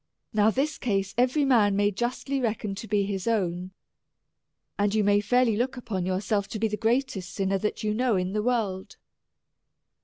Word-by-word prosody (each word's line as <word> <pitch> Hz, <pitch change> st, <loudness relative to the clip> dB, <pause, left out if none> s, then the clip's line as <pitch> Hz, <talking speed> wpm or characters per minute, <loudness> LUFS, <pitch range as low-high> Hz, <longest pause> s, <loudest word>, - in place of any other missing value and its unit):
— -, -, -48 dB
Now 210 Hz, 0 st, +4 dB
this 275 Hz, +7 st, -1 dB
case 195 Hz, -5 st, -1 dB
every 255 Hz, +4 st, +2 dB
man 220 Hz, -7 st, +4 dB
may 205 Hz, +1 st, +2 dB
justly 250 Hz, +5 st, -2 dB
reckon 220 Hz, -3 st, -2 dB
to 205 Hz, +3 st, -7 dB
be 205 Hz, -2 st, +1 dB
his 195 Hz, 0 st, -3 dB
own. 185 Hz, -5 st, 0 dB, 1.1 s
And 205 Hz, +1 st, +1 dB
you 215 Hz, -, +3 dB
may 205 Hz, 0 st, +3 dB
fairly 240 Hz, +1 st, +2 dB
look 250 Hz, +4 st, -1 dB
upon 195 Hz, -7 st, -3 dB
your 185 Hz, 0 st, 0 dB
self 200 Hz, 0 st, 0 dB
to 215 Hz, -, -5 dB
be 225 Hz, -, +2 dB
the 210 Hz, -, -2 dB
greatest 230 Hz, -4 st, -1 dB
sinner 195 Hz, 0 st, 0 dB
that 210 Hz, +2 st, -3 dB
you 210 Hz, 0 st, 0 dB
know 245 Hz, 0 st, +1 dB
in 185 Hz, 0 st, -1 dB
the 210 Hz, -, 0 dB
world. 210 Hz, -5 st, -2 dB
210 Hz, 190 wpm, -26 LUFS, 195-240 Hz, 1.1 s, Now